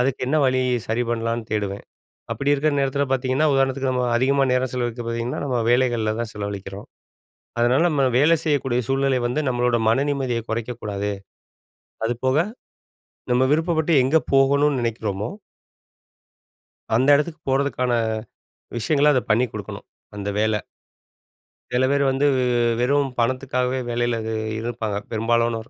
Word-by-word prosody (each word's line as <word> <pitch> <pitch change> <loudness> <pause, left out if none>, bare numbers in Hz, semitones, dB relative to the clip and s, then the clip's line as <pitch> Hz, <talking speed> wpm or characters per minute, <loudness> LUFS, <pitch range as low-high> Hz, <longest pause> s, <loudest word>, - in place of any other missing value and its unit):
அதுக்கு 130 +1 0
என்ன 150 +4 +1
வழி? 130 0 +2 0.2
சரி 115 +2 0
பண்ணலான்னு 115 0 -2
தேடுவேன். 100 -2 -2 0.5
அப்டி 140 +1 +1
இருக்க 145 +2 +1
நேரத்தில 140 +1 +1
பார்த்தீங்கன்னா, 135 +3 +1
உதாரணத்துக்கு 135 0 +1
நம்ம 125 -1 0
அதிகமா 135 +2 +2
நேரம் 125 -1 0
செலவழிக்க 120 -1 -2
பார்த்தீங்கன்னா, 115 +1 -3
நம்ம 125 -3 0
வேலைகள்ல 120 -3 +2
தான் 120 -1 -3
செலவழிக்கிறோம். 100 0 -6 0.7
அதனால 125 +5 +3
நம்ம 145 -3 +1 0.2
வேலை 165 +4 +5
செய்யக்கூடிய 135 -5 +1
சூழ்நிலை 135 -1 +1
வந்து, 125 +5 -1
நம்மளோட 125 -1 +1
மன 130 +5 +3
நிம்மதிய 130 -4 -1
குறைக்க 115 +2 -3
கூடாது. 105 0 -3 1.0
அதுபோக 130 +4 0 0.9
நம்ம 125 +1 +3
விருப்பப்பட்டு 160 0 +1
எங்க 145 +5 +3 0.2
போகணுனு 140 +1 +4
நெனைக்கிறோமோ 110 -3 -2 1.7
அந்த 130 +4 +2
இடத்துக்கு 155 +2 -2
போறதுக்கான 130 -2 0 0.9
விஷயங்கள 150 +4 +3
அத 130 - +2
பண்ணி 120 +4 +3
குடுக்கணும். - - -7 0.3
அந்த 100 0 -4
வேல 110 0 +2 1.2
சில 130 +1 +3
பேர் 140 0 +2
வந்து 135 +2 +1 0.5
வெறும் 140 +3 +2
பணத்துக்காவே 130 +1 0
வேலையில 120 0 0 0.4
இருப்பாங்க 110 -3 -3
பெரும்பாலானோர். 115 0 0
125 Hz, 125 wpm, -22 LUFS, 115-135 Hz, 1.7 s, வேலை